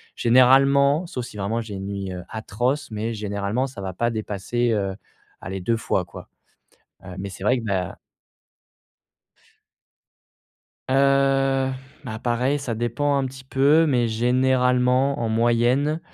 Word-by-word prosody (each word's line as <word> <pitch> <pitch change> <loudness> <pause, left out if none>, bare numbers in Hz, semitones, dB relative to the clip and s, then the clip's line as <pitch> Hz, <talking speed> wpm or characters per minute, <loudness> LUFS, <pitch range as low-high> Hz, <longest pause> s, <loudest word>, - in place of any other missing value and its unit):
Généralement, 135 +5 +4
sauf 130 -8 -5
si 105 - -11
vraiment 110 +4 -2
j'ai 110 -3 -7
une 95 0 -6
nuit, 100 -1 -4
heu, 90 -1 -7
atroce, 120 +6 -2
mais 110 +2 -3
généralement 105 +4 -2
ça 115 -6 -10
va 95 -1 -5
pas 120 +5 0
dépasser, 110 +2 -2
heu, 100 -3 -1 0.4
allez 95 +1 -6
2 115 +5 0
fois, 95 -4 -1
quoi. 90 - -12 0.8
Heu, 90 0 -9
mais 100 +1 -5
c'est 95 - -10
vrai 125 +5 +2
que, 115 - -6
ben 95 -4 -2 2.9
Heu, 135 -1 +3 0.3
bah, 110 0 -5
pareil, 125 +4 0
ça 125 -5 -4
dépend 120 +5 0
un 135 - +1
petit 130 0 -7
peu, 140 +5 +3
mais 125 -5 +2
généralement 125 +3 +2
en 115 - -1
moyenne, 120 +7 +2
120 Hz, 140 wpm, -23 LUFS, 105-135 Hz, 2.9 s, Généralement